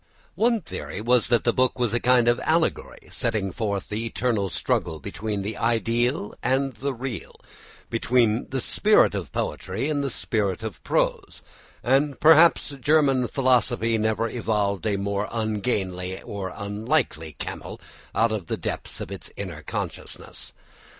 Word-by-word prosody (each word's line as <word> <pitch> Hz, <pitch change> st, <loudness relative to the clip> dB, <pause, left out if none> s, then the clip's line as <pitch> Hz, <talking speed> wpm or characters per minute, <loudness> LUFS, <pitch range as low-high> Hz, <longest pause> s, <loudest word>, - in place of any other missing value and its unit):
One 230 Hz, -1 st, +2 dB
theory 150 Hz, -, -6 dB
was 120 Hz, +2 st, +3 dB
that 120 Hz, 0 st, +2 dB
the 120 Hz, -, +2 dB
book 130 Hz, 0 st, +2 dB
was 120 Hz, -3 st, 0 dB
a 120 Hz, -, +2 dB
kind 125 Hz, -1 st, +4 dB
of 120 Hz, 0 st, +4 dB
allegory, 160 Hz, +1 st, 0 dB
setting 110 Hz, -5 st, -1 dB
forth 100 Hz, 0 st, -2 dB
the 105 Hz, +2 st, -2 dB
eternal 115 Hz, -3 st, 0 dB
struggle 85 Hz, -2 st, -1 dB
between 105 Hz, +6 st, -4 dB
the 105 Hz, +2 st, -3 dB
ideal 120 Hz, -, +1 dB
and 135 Hz, +1 st, +1 dB
the 140 Hz, +3 st, -3 dB
real, 125 Hz, -2 st, -6 dB, 0.6 s
between 115 Hz, -1 st, +2 dB
the 130 Hz, -1 st, -1 dB
spirit 210 Hz, -, +4 dB
of 100 Hz, -4 st, -4 dB
poetry 110 Hz, +11 st, -2 dB
and 145 Hz, -2 st, 0 dB
the 140 Hz, -, -1 dB
spirit 105 Hz, -4 st, -1 dB
of 105 Hz, -10 st, -6 dB
prose; -, -, -1 dB, 0.4 s
and 135 Hz, +3 st, +2 dB
perhaps 160 Hz, 0 st, +6 dB
German 135 Hz, -3 st, +3 dB
philosophy 120 Hz, -4 st, +2 dB
never 110 Hz, +1 st, +1 dB
evolved 105 Hz, -5 st, -1 dB
a 100 Hz, -2 st, +1 dB
more 100 Hz, +1 st, -1 dB
ungainly 100 Hz, -5 st, -1 dB
or 95 Hz, -2 st, -5 dB
unlikely 105 Hz, -, -1 dB
camel -, -, -6 dB, 0.4 s
out 115 Hz, 0 st, +3 dB
of 105 Hz, -6 st, -3 dB
the -, -, -2 dB
depths -, -, -4 dB
of -, -, -6 dB
its -, -, -7 dB
inner -, -, -5 dB
consciousness. -, -, -6 dB
115 Hz, 150 wpm, -25 LUFS, 100-130 Hz, 0.6 s, perhaps